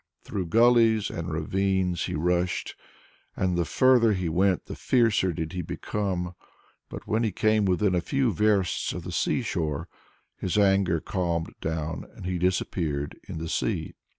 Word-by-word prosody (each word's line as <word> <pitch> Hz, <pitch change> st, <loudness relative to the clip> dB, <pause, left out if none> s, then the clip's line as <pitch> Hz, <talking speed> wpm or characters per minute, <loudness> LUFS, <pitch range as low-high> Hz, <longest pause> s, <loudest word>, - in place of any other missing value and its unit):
Through 95 Hz, -3 st, -4 dB
gullies 115 Hz, +1 st, +4 dB
and 85 Hz, +1 st, -4 dB
ravines 95 Hz, +2 st, 0 dB
he -, -, -3 dB
rushed, 90 Hz, +3 st, 0 dB, 0.6 s
and 90 Hz, -2 st, 0 dB
the 85 Hz, -1 st, +1 dB
further 120 Hz, -, +4 dB
he 90 Hz, -3 st, -1 dB
went 90 Hz, +3 st, +1 dB
the -, -, -7 dB
fiercer 115 Hz, -7 st, +2 dB
did 80 Hz, +1 st, -4 dB
he 90 Hz, -, -2 dB
become. 90 Hz, 0 st, -3 dB, 0.6 s
But -, -, -8 dB
when 110 Hz, +2 st, 0 dB
he 110 Hz, -, +1 dB
came 110 Hz, +2 st, +2 dB
within 95 Hz, +1 st, +2 dB
a 90 Hz, -, +2 dB
few 135 Hz, -, 0 dB
versts 100 Hz, -2 st, +1 dB
of -, -, -6 dB
the -, -, -6 dB
sea -, -, 0 dB
shore, 75 Hz, -4 st, -2 dB, 0.5 s
his 95 Hz, +2 st, -2 dB
anger 95 Hz, -4 st, +3 dB
calmed 85 Hz, -3 st, -2 dB
down 80 Hz, 0 st, -3 dB
and -, -, -9 dB
he 90 Hz, -1 st, -2 dB
disappeared 85 Hz, -5 st, -1 dB
in -, -, -6 dB
the 80 Hz, +1 st, -4 dB
sea. -, -, -2 dB
90 Hz, 160 wpm, -26 LUFS, 85-105 Hz, 0.6 s, gullies